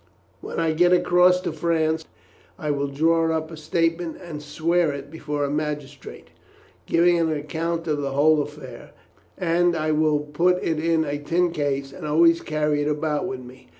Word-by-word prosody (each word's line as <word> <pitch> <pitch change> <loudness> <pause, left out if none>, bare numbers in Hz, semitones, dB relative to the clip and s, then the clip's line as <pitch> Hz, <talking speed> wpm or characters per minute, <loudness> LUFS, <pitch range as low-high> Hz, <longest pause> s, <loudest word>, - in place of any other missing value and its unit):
When - - -6
I 165 -1 +1
get 175 +3 +4
across 180 0 +4
to - - -3
France 160 0 0 0.5
I 150 -1 -2
will 140 0 -1
draw 165 +4 +2
up 160 +1 -6
a - - -7
statement 165 +2 -1
and 165 -5 -8
swear 160 +2 0
it 140 0 -8
before 150 -2 -3
a 140 - -1
magistrate, 150 -3 -5 0.6
giving 170 +1 +3
an 165 -1 +1
account 165 +3 -3
of 150 -2 0
the 135 -1 -3
whole 150 +2 +4
affair, 145 -5 -9 0.4
and 175 0 +2
I 155 0 0
will 155 -1 +2
put 170 +5 +1
it 160 -2 0
in 165 0 +1
a 145 0 -3
tin 170 +4 0
case 140 -3 -2
and 155 +1 -7
always 165 +2 +4
carry 150 -1 0
it 145 - -1
about 150 0 -1
with 130 -1 -5
me. 125 -3 -14
155 Hz, 180 wpm, -23 LUFS, 145-165 Hz, 0.6 s, get